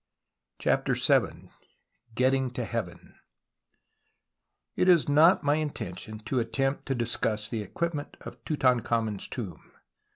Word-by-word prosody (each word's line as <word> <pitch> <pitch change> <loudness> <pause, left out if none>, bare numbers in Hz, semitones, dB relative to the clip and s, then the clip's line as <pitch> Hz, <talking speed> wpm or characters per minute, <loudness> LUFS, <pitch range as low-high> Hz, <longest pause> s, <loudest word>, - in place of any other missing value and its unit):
CHAPTER - - +1
VII - - +1 0.6
GETTIXC; 130 0 +1
TO 120 - -2
HEAVEN 110 -8 -6 1.6
It 185 - +2
is 170 -4 +5
not 155 +4 +5
my 145 +1 +2
intention 110 - -5
to 120 +4 -1
attempt 135 +4 -1
to 135 - 0
dis 120 -1 -1
cuss 105 -1 -1
the 115 -3 -3
equipment 150 +6 -4
of - - -11
Tutankhamen's 115 -7 0
tomb. 100 - -6
125 Hz, 120 wpm, -28 LUFS, 110-145 Hz, 1.6 s, is